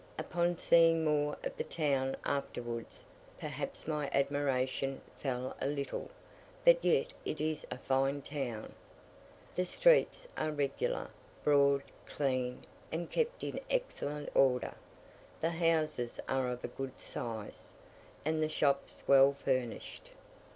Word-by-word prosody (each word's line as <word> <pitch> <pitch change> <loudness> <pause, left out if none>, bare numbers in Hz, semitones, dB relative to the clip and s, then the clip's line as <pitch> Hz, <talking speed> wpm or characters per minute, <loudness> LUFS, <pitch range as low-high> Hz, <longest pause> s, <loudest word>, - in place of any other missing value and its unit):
Upon 175 0 0
seeing 165 -1 +5
more 150 -1 +1
of - - -3
the - - -1
town 135 -4 0
afterwards, 120 -4 -3 0.3
perhaps - - -5
my 150 -3 -1
admiration 135 -1 0 0.2
fell 130 -2 -2
a - - +1
little; 140 -1 -3 0.6
but - - +7
yet 475 +1 +2
it 155 - -3
is 155 0 -2
a - - -4
fine 135 +2 +1
town. 130 -7 -4 0.8
The 180 0 0
streets - - +4
are 155 - 0
regular, 155 - -1 0.3
broad, 140 -1 +4 0.2
clean, 130 -3 -1 0.3
and 170 +2 -3
kept 485 +1 0
in - - -3
excellent 150 - -2
order; 125 -2 +3 0.7
the 165 - +1
houses 160 -7 +1
are 130 -1 +1
of 125 0 -4
a - - -1
good 135 -1 -6
size, 110 -3 -6 0.5
and 155 0 +1
the 155 - +1
shops 140 -2 +1
well 140 0 +7
furnished. 130 -3 -2
140 Hz, 125 wpm, -33 LUFS, 135-160 Hz, 0.8 s, but